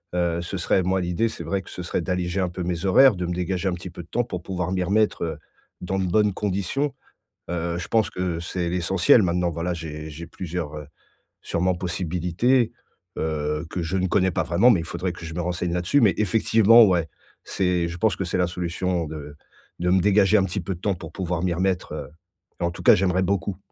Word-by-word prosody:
Heu, 85 -1 0
ce 85 +3 -5
serait 90 +1 +1
moi 95 +1 +1
l'idée, 90 +6 0
c'est - - -7
vrai 100 -1 -1
que - - -15
ce - - -7
serait 85 - -2
d'alléger 90 +1 -1
un 90 - 0
peu 90 +1 -5
mes 85 0 -3
horaires, 130 +5 +6
de 90 0 -3
me 90 - -2
dégager 90 +2 -1
un 90 - -1
petit 90 +1 -7
peu 85 0 -9
de 85 - -20
temps 120 - 0
pour 90 -7 -6
pouvoir 90 -1 -3
m'y 90 -1 0
remettre, 105 0 +1
heu, 80 - -3 0.4
dans 95 +2 -3
de 95 - 0
bonnes 105 +2 +2
conditions. 105 +9 -1 0.6
Heu, 85 0 -2
je 90 - -5
pense 110 -2 +2
que 90 -2 -3
c'est 85 +1 -3
l'essentiel 90 +4 +4
maintenant, 90 -1 +1
voilà, 85 +2 -2
j'ai 80 -2 -7
j'ai 80 +3 -8
plusieurs, 85 -3 -5
heu, 75 -2 -8 0.5
sûrement 90 +2 0
possibilités, 90 +7 0 0.4
heu, 75 0 -2
que 90 - -2
je 85 +3 -2
ne 95 - +1
connais 95 0 +2
pas 90 0 0
vraiment 85 +8 +4
mais 100 -9 +4
il 80 - -7
faudrait 90 +1 -3
que 85 - -10
je 80 - -7
me 90 - -2
renseigne 90 0 -2
là-dessus, 90 +11 +2
mais 105 -5 +5
effectivement, 110 +2 +5
ouais, 85 -5 +1 0.3
c'est 90 -3 0
je 85 +1 -6
pense 110 +3 +2
que 95 - -3
c'est 90 +1 -2
la 90 - +3
solution 90 -1 -2
de 75 -2 -8 0.4
de 90 +1 0
me 95 +1 +4
dégager 105 +2 +4
un 95 - +3
petit 95 +1 -3
peu 95 +2 -4
de - - -14
temps 100 - +1
pour 80 -2 -9
pouvoir 90 -2 -3
m'y 90 - +1
remettre, 90 -1 -1
heu 75 -2 -6 0.5
et - - 0
en 85 - +2
tout - - -9
cas - - +8
j'aimerais 95 0 +1
beaucoup. 95 -1 -1
90 Hz, 230 wpm, -24 LUFS, 85-95 Hz, 0.6 s, cas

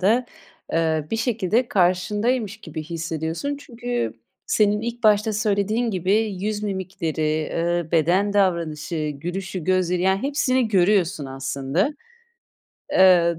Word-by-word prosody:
da, 230 +6 +3 0.5
ııı, 160 -2 +1
bir 225 - 0
şekilde 230 0 0
karşındaymış 205 +5 +1
gibi 160 -1 -6
hissediyorsun. 165 - -3
Çünkü 245 -3 -3 0.3
senin 210 - +2
ilk 235 +1 -5
başta 215 0 +4
söylediğin 215 +2 0
gibi 185 -1 0 0.3
yüz 210 +1 -2
mimikleri, 165 -6 -2
ııı, 170 -1 -1
beden 180 +6 +3
davranışı, 165 -5 0
gülüşü, 180 +3 -5
gözleri; 180 -1 +1
yani 190 +1 +2
hepsini 260 -4 +1
görüyorsun 185 -6 +2
aslında. 135 - -1 1.0
Iıı, 175 -3 +5
190 Hz, 110 wpm, -23 LUFS, 165-215 Hz, 1.0 s, Iıı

